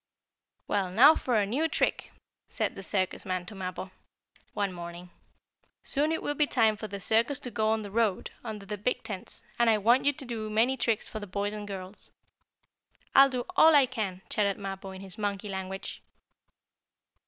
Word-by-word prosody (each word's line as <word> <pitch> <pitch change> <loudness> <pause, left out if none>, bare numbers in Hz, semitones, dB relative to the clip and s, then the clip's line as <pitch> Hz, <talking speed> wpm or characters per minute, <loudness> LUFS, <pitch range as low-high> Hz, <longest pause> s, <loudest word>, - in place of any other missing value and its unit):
"Well, 195 -3 0
now 245 +11 +8
for 250 -6 -1
a 210 -2 +3
new 270 +11 0
trick," 315 - -1 0.4
said - - -1
the - - -8
circus 190 -1 -1
man 185 -2 -3
to 195 - -10
Mappo, 185 -1 -5 0.6
one 200 -2 -1
morning. 175 0 -8 0.7
"Soon 295 +3 0
it 320 - -2
will 290 - 0
be 295 0 +2
time 220 -4 +3
for 215 +1 -6
the 200 -1 -6
circus 230 +7 +2
to 245 - -5
go 215 0 +1
out - - +4
on 220 - -1
the 205 - -8
road, 220 -3 0
under 215 -4 -6
the 210 0 -5
big 250 +5 -1
tents, 195 -4 -7 0.2
and 235 -1 +5
I 220 - +5
want 235 +6 +3
you 285 - +4
to 275 -1 -8
do 225 -3 -4
many 230 +5 +3
tricks 230 -4 0
for 215 - -6
the 205 - -7
boys 200 +2 -2
and 210 -1 -6
girls." 190 0 -6 1.0
"I'll 275 0 +8
do 250 -2 -3
all 320 -1 +7
I 280 -2 +7
can!" 210 -7 -4
chattered 200 -2 +1
Mappo, 195 -1 -6
in 190 0 -9
his 190 0 -9
monkey 205 0 -2
language. 190 0 -5
210 Hz, 195 wpm, -29 LUFS, 195-240 Hz, 1.0 s, now